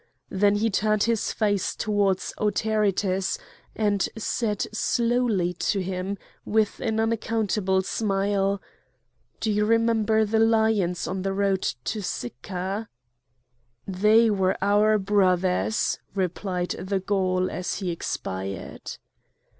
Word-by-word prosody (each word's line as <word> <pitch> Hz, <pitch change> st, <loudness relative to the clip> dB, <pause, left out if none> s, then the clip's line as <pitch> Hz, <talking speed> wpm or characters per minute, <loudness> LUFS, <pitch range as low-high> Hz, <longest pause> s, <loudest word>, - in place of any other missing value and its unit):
Then 200 Hz, +1 st, +3 dB
he 220 Hz, +2 st, +1 dB
turned 215 Hz, +1 st, +2 dB
his 230 Hz, -2 st, 0 dB
face 205 Hz, -3 st, 0 dB
towards 200 Hz, -3 st, 0 dB
Autaritus, 205 Hz, -3 st, +1 dB, 0.4 s
and 205 Hz, -2 st, +1 dB
said 215 Hz, -1 st, -1 dB
slowly 230 Hz, -6 st, +1 dB
to 195 Hz, +3 st, -1 dB
him 190 Hz, +1 st, -3 dB, 0.3 s
with 215 Hz, 0 st, +1 dB
an 220 Hz, -2 st, -1 dB
unaccountable 220 Hz, -4 st, 0 dB
smile: 200 Hz, -1 st, 0 dB, 0.8 s
"Do 220 Hz, -, 0 dB
you 210 Hz, 0 st, +2 dB
remember 220 Hz, -1 st, +3 dB
the 220 Hz, +1 st, +1 dB
lions 220 Hz, -5 st, +2 dB
on 185 Hz, +2 st, -3 dB
the 195 Hz, +1 st, -1 dB
road 195 Hz, -1 st, +1 dB, 0.2 s
to 215 Hz, -, -3 dB
Sicca?" 185 Hz, -, -4 dB, 1.0 s
"They 210 Hz, +4 st, +4 dB
were 190 Hz, -2 st, +1 dB
our 210 Hz, +2 st, +3 dB
brothers!" 190 Hz, 0 st, +1 dB, 0.2 s
replied 180 Hz, -1 st, -2 dB
the 190 Hz, +1 st, -1 dB
Gaul, 185 Hz, -1 st, 0 dB
as 180 Hz, -, -3 dB
he 185 Hz, -3 st, -2 dB
expired. 95 Hz, -, -5 dB
200 Hz, 110 wpm, -25 LUFS, 190-220 Hz, 1.0 s, They